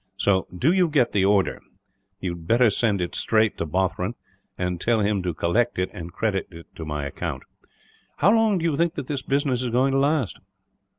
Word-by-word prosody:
So, 95 -2 +2
do 120 - +1
you 185 -2 +3
get 145 -6 +2
the 95 -2 +2
order. 100 -1 +2 0.6
You 95 -2 -3
had 85 -1 -9
better 115 +1 +4
send 100 -2 +1
it 90 - -3
straight 110 -1 +1
to 85 - -2
Bothron; 95 +5 -1 0.4
and 90 -1 -2
tell 115 -2 +2
him 100 -1 +1
to 90 -1 -1
collect 110 +9 +1
it, 90 0 -1
and 85 -4 -7
credit 100 -2 -1
it 85 -2 -12
to 80 - -7
my 75 -2 -3
account. 70 - -5 0.7
"How 195 +8 +4
long 225 -3 +3
do 170 - -2
you 160 -4 +1
think 170 +2 +1
that - - -4
this 140 0 -3
business 135 -3 0
is 125 - -2
going 130 +3 +2
to 135 - +2
last?" 140 -4 0
110 Hz, 205 wpm, -24 LUFS, 90-135 Hz, 0.7 s, better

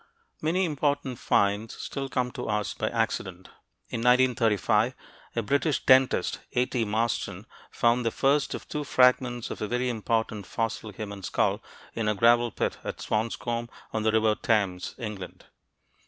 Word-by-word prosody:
Many 175 +5 +1
important 145 -5 -1
finds 100 +2 +1
still 135 -1 -5
come 125 -1 -1
to 125 -4 -5
us 105 -1 -1
by - - -2
accident. 95 -1 -2 0.4
In - - -3
1935, 120 -2 +3 0.4
a 115 - +1
British 140 +6 0
dentist, 130 0 +4
A. 125 - +3
T. 120 -3 -1
Marston, 110 +2 -1 0.2
found 120 +1 +2
the 115 - +2
first 140 +5 +1
of - - -9
two 150 -1 -3
fragments 125 -3 +3
of - - -6
a 105 - -1
very 125 +3 0
important 110 -3 -1
fossil 115 -1 -3
human 100 -1 -7
skull, 90 - 0 0.3
in 115 -2 -2
a 105 - +2
gravel 120 +2 +4
pit - - -2
at - - -5
Swanscombe, 115 +2 -2 0.2
on 110 - 0
the 110 0 +2
River 110 0 +3
Thames, 100 -5 0
England. 105 -6 -7
115 Hz, 155 wpm, -27 LUFS, 105-125 Hz, 0.4 s, dentist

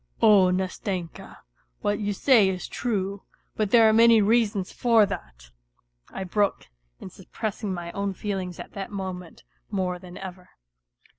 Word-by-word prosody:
" - - -38
Oh, 200 -4 +6
Nastenka, 185 -1 -4 0.4
what 205 - 0
you 205 -1 -1
say 210 -1 +4
is 185 -1 -4
true; 200 -4 -3 0.3
but 215 -2 0
there 230 0 +6
are 220 - +4
many 230 0 +6
reasons 210 -3 +1
for 230 -3 +4
that," - - -8 0.6
I 190 - -6
broke 200 - -1 0.3
in 185 - -9
suppressing 205 +3 -5
my 175 -2 -5
own 200 0 -3
feelings 190 -4 -4
at - - -9
that 195 -1 -6
moment 185 -3 -7 0.3
more 180 -1 -2
than 180 -1 -11
ever. 185 -1 -9
195 Hz, 150 wpm, -25 LUFS, 180-210 Hz, 0.6 s, Oh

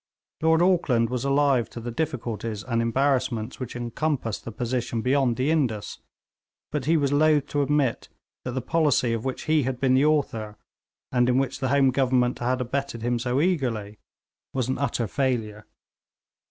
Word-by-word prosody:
Lord 160 +1 +4
Auckland 130 -11 +2
was 125 -2 -2
alive 140 -3 +2
to - - -8
the 120 +1 -5
difficulties 115 -7 -3
and 115 -2 -1
embarrassments 125 -1 0
which 125 -2 -6
encompassed 120 -1 -2
the 115 - -5
position 120 0 -2
beyond 130 -2 +2
the 135 +4 +1
Indus, 125 -10 -1 0.7
but 145 -4 -2
he 160 +2 +3
was 140 -2 +1
loth 150 -1 +4
to 145 - 0
admit 140 -4 0 0.3
that 125 - -4
the 130 -1 -3
policy 145 -5 +2
of 115 +1 -3
which 130 - -3
he 155 -1 +2
had 130 -1 -2
been 130 -2 +2
the 135 +3 +4
author, 115 -9 0 0.5
and 125 0 +2
in 125 - +3
which 135 0 -1
the 130 - -1
Home 135 -1 +4
Government 125 -2 +1
had 125 +1 0
abetted 125 -1 -3
him 120 0 0
so 125 +2 0
eagerly, 120 - -1 0.6
was 130 -3 0
an 130 - -2
utter 140 -4 0
failure. 110 -4 -2
130 Hz, 170 wpm, -25 LUFS, 115-140 Hz, 0.7 s, Lord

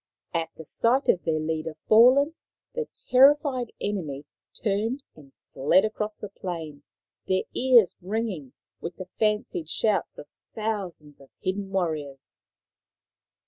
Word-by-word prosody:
At 165 -1 -1
the 160 - -10
sight 250 - +1
of 180 - +3
their 160 -2 +1
leader 155 0 -3
fallen, 255 +7 +6 0.4
the 475 -1 -3 0.2
terrified 270 -2 +5
enemy 155 -9 -3 0.4
turned 225 +6 0
and 145 -3 -16 0.2
fled 170 +9 +4
across 215 0 -3
the 210 - -7
plain, 165 -7 -6 0.5
their 185 0 +2
ears 245 -6 +5
ringing 190 - -3 0.3
with 170 0 -6
the 185 - -7
fancied 210 -7 0
shouts 210 +1 0
of 145 - -10 0.3
thousands 190 -10 -4
of 135 - -17
hidden 195 +1 -3
warriors. 155 -8 -3
195 Hz, 125 wpm, -26 LUFS, 160-225 Hz, 0.5 s, fallen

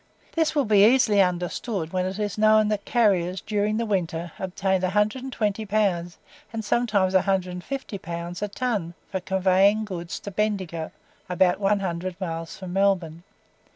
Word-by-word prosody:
This 320 -2 0
will 285 -3 +2
be 205 -2 +5
easily 220 -3 +5
understood 180 0 -2
when 185 0 0
it 190 +1 -4
is 205 -3 -2
known 215 0 +4
that 210 -1 -2
carriers, 190 -6 +2
during 210 0 -1
the 230 - 0
winter, 175 -5 -2
obtained 190 0 0
120 210 +2 0
pounds 190 -5 0 0.3
and 220 -1 -4
sometimes 205 -5 +1
150 190 +5 -1
pounds 170 +1 -6
a 210 - 0
ton 205 -6 -2 0.2
for 190 - -1
conveying 190 +3 +3
goods 175 -4 -5
to 200 - -7
Bendigo 185 -6 -2 0.4
(about 180 +1 +2
one 200 0 +2
hundred 180 0 -3
miles 165 -3 -5
from 185 -2 -7
Melbourne). 185 -4 +1
195 Hz, 150 wpm, -25 LUFS, 180-215 Hz, 0.4 s, be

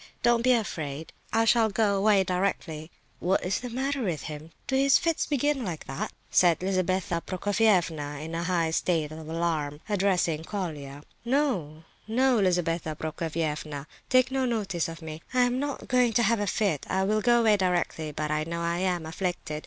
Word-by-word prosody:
Don't 240 -1 +4
be 255 +1 +4
afraid; 160 - -3 0.2
I 225 0 +3
shall 225 0 +4
go 205 -1 +2
away 200 0 +4
directly." 180 -4 -2 0.3
"What's 185 +1 +1
the 250 - -6
matter 270 +3 -2
with 175 -9 -2
him? 155 +1 -7 0.2
Do 265 - -1
his 275 +1 +5
fits 330 -2 0
begin 290 -1 +1
like 175 -7 -5
that?" 135 - -4 0.2
said 175 -2 +4
Lizabetha 185 -2 0
Prokofievna, 180 -7 +1
in 160 +2 -6
a 165 - -1
high 170 -2 0
state 160 -2 0
of 155 0 -8
alarm, 160 -3 -1
addressing 185 -6 +1
Colia. 150 -7 -5 0.2
"No, 230 - 0 0.2
no, 250 +2 +3
Lizabetha 175 -4 0
Prokofievna, 155 -2 -3 0.2
take 255 0 +4
no 265 0 0
notice 200 -9 -1
of 165 0 -9
me. 155 0 -7
I 250 - +5
am 245 +1 +2
not 285 0 -4
going 250 -2 +3
to 235 +2 +3
have 230 +1 +3
a 205 - -1
fit. 190 -7 0
I 190 - +1
will 215 +2 +1
go 240 +1 +4
away 220 -2 +5
directly; 175 -5 0
but 150 +1 -3
I 150 0 +1
know 170 +1 -4
I 170 +1 -1
am 180 -3 0
afflicted. 165 -2 -3
180 Hz, 175 wpm, -27 LUFS, 160-225 Hz, 0.3 s, his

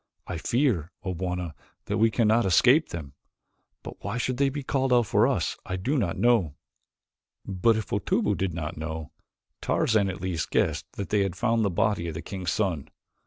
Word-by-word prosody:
I 90 -3 -4
fear, 115 - +1
O 95 -2 -2
Bwana, 90 -1 -3 0.3
that - - -1
we 115 +1 +5
cannot 115 +1 +3
escape 125 - +4
them. 80 -5 -7 0.7
But - - -10
why - - -3
they - - -1
should 125 +1 -1
be 145 +1 -5
called 135 -1 0
out 120 -1 +5
for - - +3
us - - -1
I 90 - -4
do 110 +11 -1
not 100 - 0
know." 110 -12 +3 0.9
But 100 +4 +2
if 110 - -5
Otobu - - +1
did 95 -3 -2
not 75 -3 -4
know, 80 0 -5 0.5
Tarzan 105 -3 +2
at 95 +1 -5
least 90 -3 -2
guessed - - 0
that 100 - -5
they 105 - +2
had 95 -3 -1
found 115 -2 +1
the 100 - +2
body 90 -1 0
of 80 - -5
the 80 - -5
king's 95 -3 -3
son. 90 -9 -1
95 Hz, 190 wpm, -27 LUFS, 85-115 Hz, 0.9 s, we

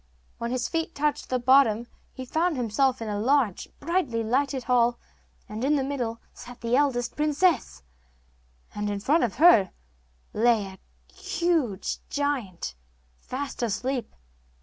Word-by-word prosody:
When 235 - -3
his 250 0 -1
feet 330 0 -3
touched 295 +1 -1
the 255 - +1
bottom 245 -3 +4 0.3
he 260 - -8
found 320 +4 0
himself 250 +2 +1
in - - -5
a 205 -1 -2
large, 245 -4 +1
brilliantly 285 -8 -1
lighted 265 +3 0
hall, 240 0 +2 0.5
and 215 +3 -6
in 290 +3 +3
the 275 - +1
middle 245 -5 -3
sat 245 0 -12
the 235 +1 +1
eldest 255 -4 +1
princess, 300 - +1 0.9
and 210 0 -3
in 205 -1 -2
front 295 +11 +2
of 230 -5 -1
her 250 - +6 0.6
lay 225 -1 +3
a 190 0 -16
huge 320 - -1
giant, 255 - -2 0.5
fast 270 +1 -5
asleep. 245 +3 -2
250 Hz, 140 wpm, -26 LUFS, 225-285 Hz, 0.9 s, her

